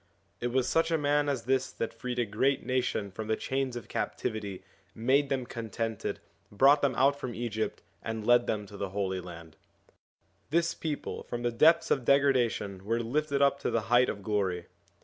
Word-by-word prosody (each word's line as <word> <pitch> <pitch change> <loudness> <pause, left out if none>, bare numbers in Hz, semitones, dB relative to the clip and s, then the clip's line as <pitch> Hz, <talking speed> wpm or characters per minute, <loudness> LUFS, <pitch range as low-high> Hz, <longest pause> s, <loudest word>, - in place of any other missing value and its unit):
It 120 - -1
was 125 +1 +1
such 165 0 +2
a 165 - +2
man 145 0 +2
as 135 -4 -1
this 130 +1 +1
that 115 - -3
freed 125 +2 -5
a 120 - +2
great 130 +7 0
nation 125 -5 -1
from 110 +3 -6
the 110 - +1
chains 130 0 -2
of 120 - -7
captivity, 105 -3 -3 0.3
made 135 +5 +2
them 130 -2 -1
contented, 115 -1 -4 0.3
brought 135 +8 +5
them 135 -3 +1
out 140 +2 +3
from 120 -2 -5
Egypt, 110 -2 -3 0.2
and 110 -1 -4
led 120 0 +5
them 105 -1 -1
to 100 0 -11
the 100 -1 -3
Holy 95 -1 -2
Land. 85 -3 -11 0.9
This 170 +2 +2
people 155 -3 -4
from 120 0 -5
the 120 - +1
depths 160 +8 +4
of 135 - +2
degradation 120 -8 +2
were 115 +3 0
lifted 140 +3 0
up 140 0 +3
to - - -1
the 115 - +1
height 125 +1 +6
of 100 -1 -5
glory. 95 -4 -1
120 Hz, 190 wpm, -29 LUFS, 105-140 Hz, 0.9 s, height